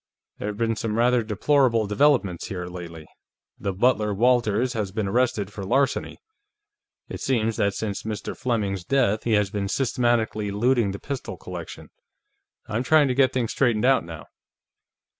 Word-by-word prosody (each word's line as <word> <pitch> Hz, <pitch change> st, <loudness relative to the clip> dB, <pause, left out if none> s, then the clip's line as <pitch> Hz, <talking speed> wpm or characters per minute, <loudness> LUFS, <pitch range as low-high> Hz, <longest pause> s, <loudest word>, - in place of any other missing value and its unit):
"There -, -, -4 dB
have 105 Hz, -1 st, -4 dB
been 115 Hz, 0 st, 0 dB
some 110 Hz, 0 st, -3 dB
rather 120 Hz, +1 st, +3 dB
deplorable 115 Hz, +1 st, +2 dB
developments 105 Hz, -, +2 dB
here, 90 Hz, -3 st, -5 dB
lately. 85 Hz, -3 st, -8 dB, 0.5 s
The 100 Hz, -, -2 dB
butler, 105 Hz, 0 st, +1 dB
Walters, 120 Hz, +1 st, +2 dB
has 105 Hz, -5 st, -3 dB
been 105 Hz, 0 st, -2 dB
arrested 105 Hz, -2 st, 0 dB
for 100 Hz, -, -6 dB
larceny. 135 Hz, +8 st, 0 dB, 0.9 s
It -, -, -7 dB
seems 115 Hz, -4 st, 0 dB
that 100 Hz, -1 st, +1 dB
since 105 Hz, -3 st, -3 dB
Mr. 110 Hz, -1 st, -5 dB
Fleming's 105 Hz, -7 st, -2 dB
death, 120 Hz, -3 st, +1 dB
he 115 Hz, -, +1 dB
has 105 Hz, -2 st, +2 dB
been 100 Hz, -1 st, -2 dB
systematically 120 Hz, -3 st, 0 dB
looting 115 Hz, +2 st, +2 dB
the 95 Hz, -, -4 dB
pistol 140 Hz, +4 st, -6 dB
collection. -, -, -9 dB, 0.7 s
I'm 110 Hz, +2 st, -2 dB
trying 145 Hz, +1 st, +4 dB
to -, -, +1 dB
get 130 Hz, 0 st, +3 dB
things 125 Hz, -4 st, -1 dB
straightened 120 Hz, -4 st, +1 dB
out, 135 Hz, 0 st, +4 dB
now." 80 Hz, -2 st, -9 dB
110 Hz, 160 wpm, -24 LUFS, 100-125 Hz, 0.9 s, trying